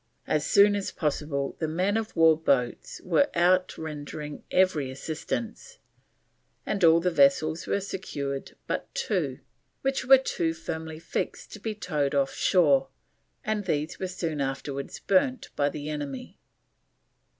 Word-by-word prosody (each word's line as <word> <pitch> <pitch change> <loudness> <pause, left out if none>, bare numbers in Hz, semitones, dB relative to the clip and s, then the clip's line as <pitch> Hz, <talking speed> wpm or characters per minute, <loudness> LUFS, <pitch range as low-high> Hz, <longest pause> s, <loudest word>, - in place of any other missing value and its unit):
As 150 -1 0
soon 205 0 +6
as 200 -1 -2
possible 145 -3 -2
the 160 - -1
men 185 +6 0
of 225 -1 -2
war 165 -1 +6
boats 135 -6 0
were 185 - +3
out 180 +2 +3
rendering 150 -1 -6
every 180 -8 +2
assistance, 160 - -5 0.9
and 200 - -2
all 165 0 +7
the 180 +2 0
vessels 155 +2 +3
were - - +1
secured 140 -8 -5
but - - -3
two, 480 -1 -1 0.4
which 270 0 0
were 265 +1 +8
too 170 -10 -1
firmly 160 -1 -5
fixed 165 - -4
to 215 - -8
be 215 +1 -4
towed 145 -8 -1
off 135 -1 +1
shore, 145 -7 +3 0.6
and 210 -2 -1
these 155 -3 -2
were 190 - -2
soon 165 -5 -3
afterwards 135 +1 -4
burnt 255 +6 +1
by 145 0 +2
the 145 0 -6
enemy. 145 -3 -5
160 Hz, 140 wpm, -27 LUFS, 145-190 Hz, 0.9 s, were